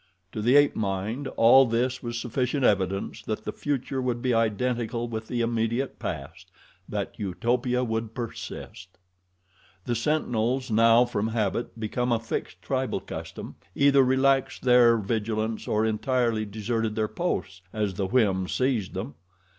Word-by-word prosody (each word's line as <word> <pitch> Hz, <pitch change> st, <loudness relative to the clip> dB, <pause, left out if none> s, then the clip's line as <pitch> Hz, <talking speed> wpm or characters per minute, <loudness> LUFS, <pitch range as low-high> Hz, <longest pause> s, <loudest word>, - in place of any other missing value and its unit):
To 110 Hz, -, -4 dB
the 120 Hz, +5 st, +3 dB
ape 145 Hz, 0 st, +5 dB
mind 105 Hz, +7 st, -2 dB
all 130 Hz, +3 st, +7 dB
this 125 Hz, +3 st, 0 dB
was 120 Hz, -1 st, -4 dB
sufficient 125 Hz, +3 st, -1 dB
evidence 100 Hz, -2 st, 0 dB
that 110 Hz, 0 st, -4 dB
the -, -, -3 dB
future 135 Hz, -2 st, -2 dB
would 125 Hz, -2 st, -1 dB
be 125 Hz, 0 st, 0 dB
identical 115 Hz, +1 st, 0 dB
with 110 Hz, -1 st, -5 dB
the 120 Hz, -1 st, -1 dB
immediate 115 Hz, +3 st, -1 dB
past -, -, -6 dB, 0.4 s
that -, -, -4 dB
Utopia 125 Hz, +5 st, 0 dB
would 110 Hz, -1 st, -3 dB
persist. 100 Hz, -6 st, -7 dB, 0.9 s
The 120 Hz, -, -1 dB
sentinels, 125 Hz, -1 st, 0 dB
now 115 Hz, +2 st, +5 dB
from 110 Hz, -3 st, -2 dB
habit 115 Hz, +1 st, -2 dB
become 120 Hz, +3 st, -1 dB
a 115 Hz, -, +3 dB
fixed 115 Hz, -, -5 dB
tribal -, -, -1 dB
custom, -, -, -8 dB, 0.2 s
either 140 Hz, -1 st, +5 dB
relaxed 135 Hz, +1 st, +2 dB
their 125 Hz, -2 st, +6 dB
vigilance 110 Hz, +1 st, -2 dB
or 110 Hz, +1 st, +1 dB
entirely 115 Hz, 0 st, 0 dB
deserted 110 Hz, +1 st, -2 dB
their 110 Hz, -1 st, 0 dB
posts, 95 Hz, -, -3 dB
as 105 Hz, -3 st, -1 dB
the 95 Hz, +1 st, -2 dB
whim 95 Hz, -5 st, +2 dB
seized 125 Hz, -3 st, -1 dB
them. 70 Hz, -, -4 dB
115 Hz, 145 wpm, -26 LUFS, 110-125 Hz, 0.9 s, all